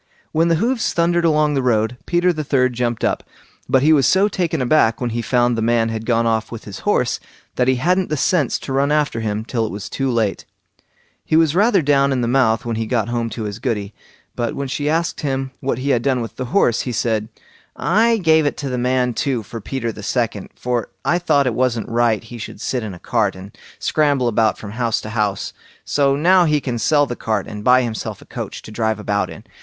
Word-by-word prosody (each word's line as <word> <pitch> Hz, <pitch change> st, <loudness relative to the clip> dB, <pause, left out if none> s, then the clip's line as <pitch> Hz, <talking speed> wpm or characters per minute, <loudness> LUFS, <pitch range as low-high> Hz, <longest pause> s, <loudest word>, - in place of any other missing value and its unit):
When 165 Hz, +2 st, +2 dB
the 165 Hz, -, +3 dB
hoofs 230 Hz, +7 st, 0 dB
thundered 170 Hz, 0 st, +2 dB
along 150 Hz, -2 st, +3 dB
the 135 Hz, -, +1 dB
road, 115 Hz, -2 st, +1 dB
Peter 175 Hz, +1 st, +2 dB
the 155 Hz, -2 st, -3 dB
third 130 Hz, -3 st, +1 dB
jumped 120 Hz, -1 st, -2 dB
up; -, -, 0 dB, 0.5 s
but 130 Hz, 0 st, +3 dB
he 155 Hz, +2 st, +5 dB
was 140 Hz, -4 st, +4 dB
so 195 Hz, +2 st, +4 dB
taken 175 Hz, -6 st, -1 dB
aback 125 Hz, -3 st, +3 dB
when 125 Hz, -2 st, -2 dB
he 120 Hz, +1 st, -2 dB
found 120 Hz, 0 st, +2 dB
the 115 Hz, -, -2 dB
man 115 Hz, 0 st, +2 dB
had 110 Hz, 0 st, -5 dB
gone 115 Hz, -1 st, +2 dB
off 110 Hz, -1 st, 0 dB
with 115 Hz, -, -7 dB
his 100 Hz, -, -8 dB
horse -, -, +1 dB, 0.4 s
that 125 Hz, -, +1 dB
he 130 Hz, -, +4 dB
hadn't 180 Hz, +8 st, +1 dB
the 155 Hz, -, -1 dB
sense 150 Hz, -2 st, +1 dB
to 135 Hz, -, -5 dB
run 140 Hz, +2 st, +2 dB
after 150 Hz, -6 st, +1 dB
him 110 Hz, 0 st, -2 dB
till 120 Hz, -2 st, -1 dB
it 110 Hz, -, -3 dB
was 100 Hz, 0 st, -6 dB
too 135 Hz, -1 st, -2 dB
late. 115 Hz, -5 st, 0 dB, 0.8 s
He -, -, 0 dB
was 160 Hz, -2 st, +4 dB
rather 200 Hz, -1 st, +3 dB
down 140 Hz, -1 st, +3 dB
in 130 Hz, -2 st, 0 dB
the 120 Hz, -, 0 dB
mouth 120 Hz, -3 st, +2 dB
when 115 Hz, -1 st, -2 dB
he 115 Hz, 0 st, -2 dB
got 115 Hz, -1 st, 0 dB
home 120 Hz, -1 st, -1 dB
to 115 Hz, -, -5 dB
his 105 Hz, 0 st, -5 dB
Goody; 105 Hz, -2 st, -2 dB, 0.4 s
but 120 Hz, -2 st, -2 dB
when 140 Hz, -, -3 dB
she 145 Hz, +3 st, -2 dB
asked 165 Hz, +2 st, -1 dB
him 135 Hz, -2 st, -2 dB
what 130 Hz, -3 st, -2 dB
he 135 Hz, +2 st, -1 dB
had 120 Hz, -, +2 dB
done 130 Hz, 0 st, +1 dB
with 115 Hz, -1 st, -6 dB
the 130 Hz, -, -4 dB
horse, 120 Hz, -, +2 dB
he 125 Hz, -, -4 dB
said, 110 Hz, -1 st, -1 dB, 0.5 s
"I 220 Hz, -, +2 dB
gave 160 Hz, -5 st, +3 dB
it -, -, -2 dB
to 140 Hz, -, -4 dB
the 125 Hz, -1 st, -2 dB
man 125 Hz, 0 st, +1 dB
too 125 Hz, -1 st, -1 dB
for 115 Hz, +3 st, -8 dB
Peter 115 Hz, +2 st, -3 dB
the 105 Hz, -, -10 dB
second, 110 Hz, -2 st, -2 dB
for 120 Hz, -2 st, -2 dB, 0.2 s
I 175 Hz, -, +2 dB
thought 150 Hz, -5 st, +2 dB
it 125 Hz, -, 0 dB
wasn't 120 Hz, -3 st, 0 dB
right 115 Hz, -2 st, +1 dB
he 120 Hz, +1 st, -10 dB
should 115 Hz, -, -8 dB
sit 125 Hz, -, -2 dB
in 105 Hz, -4 st, -6 dB
a -, -, -13 dB
cart, 105 Hz, -2 st, 0 dB
and 95 Hz, +2 st, -11 dB, 0.2 s
scramble 145 Hz, -5 st, +1 dB
about 110 Hz, -2 st, +2 dB
from 100 Hz, -, -8 dB
house 115 Hz, 0 st, 0 dB
to 110 Hz, -, -7 dB
house; 105 Hz, -3 st, -1 dB, 0.3 s
so 140 Hz, -1 st, +2 dB
now 175 Hz, +5 st, +4 dB
he 150 Hz, -2 st, +2 dB
can 125 Hz, -3 st, -3 dB
sell 145 Hz, +6 st, +3 dB
the 125 Hz, -, -5 dB
cart 110 Hz, -4 st, -2 dB
and 105 Hz, -1 st, -8 dB
buy 125 Hz, +1 st, +5 dB
himself 115 Hz, -2 st, -4 dB
a -, -, -15 dB
coach -, -, -7 dB
to -, -, -10 dB
drive 110 Hz, 0 st, -1 dB
about 105 Hz, -1 st, -1 dB
in." -, -, -10 dB
125 Hz, 235 wpm, -20 LUFS, 115-145 Hz, 0.8 s, he